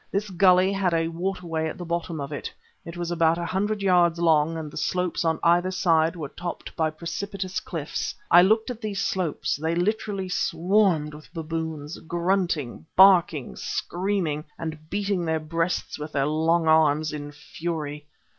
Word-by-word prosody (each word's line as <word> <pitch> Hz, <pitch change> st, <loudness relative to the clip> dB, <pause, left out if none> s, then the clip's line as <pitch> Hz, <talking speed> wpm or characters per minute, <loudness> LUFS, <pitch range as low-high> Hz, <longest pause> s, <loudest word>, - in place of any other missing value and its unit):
This 200 Hz, +1 st, -2 dB
gulley 185 Hz, +1 st, +4 dB
had 190 Hz, -3 st, +1 dB
a 165 Hz, 0 st, +1 dB
water 180 Hz, +2 st, -3 dB
way 160 Hz, -1 st, -1 dB
at -, -, -7 dB
the 175 Hz, -, -6 dB
bottom 170 Hz, -1 st, -3 dB
of 140 Hz, +1 st, -5 dB
it; 145 Hz, -, -5 dB, 0.3 s
it 170 Hz, +1 st, -9 dB
was 175 Hz, 0 st, -3 dB
about 165 Hz, -1 st, +3 dB
a 170 Hz, -, -3 dB
hundred 205 Hz, +2 st, -1 dB
yards 175 Hz, -3 st, +4 dB
long, 165 Hz, -1 st, +3 dB
and 155 Hz, -2 st, -6 dB
the -, -, -12 dB
slopes 180 Hz, -2 st, -1 dB
on 160 Hz, -1 st, +1 dB
either 175 Hz, +2 st, +4 dB
side 165 Hz, -3 st, +2 dB
were 155 Hz, -5 st, -5 dB
topped 175 Hz, +3 st, -7 dB
by 160 Hz, -1 st, +1 dB
precipitous 185 Hz, +4 st, -4 dB
cliffs. 160 Hz, -4 st, -4 dB, 0.2 s
I 175 Hz, -, +9 dB
looked 220 Hz, +6 st, +3 dB
at 240 Hz, -1 st, -8 dB
these 205 Hz, -2 st, -3 dB
slopes; 180 Hz, -8 st, -1 dB
they 160 Hz, +3 st, -1 dB
literally 195 Hz, +1 st, -1 dB
swarmed 175 Hz, -3 st, +1 dB
with 150 Hz, 0 st, -13 dB
baboons, 160 Hz, -2 st, -4 dB
grunting, 170 Hz, -5 st, -1 dB
barking, 180 Hz, -7 st, +5 dB
screaming, 175 Hz, -5 st, -2 dB
and 155 Hz, -1 st, -6 dB
beating 200 Hz, -2 st, -1 dB
their 160 Hz, -1 st, 0 dB
breasts 165 Hz, +2 st, -2 dB
with 150 Hz, +1 st, -6 dB
their 135 Hz, -1 st, +1 dB
long 160 Hz, +2 st, +1 dB
arms, 155 Hz, -1 st, +3 dB
in 145 Hz, -1 st, -6 dB
fury. 150 Hz, 0 st, -5 dB
170 Hz, 170 wpm, -25 LUFS, 155-185 Hz, 0.3 s, I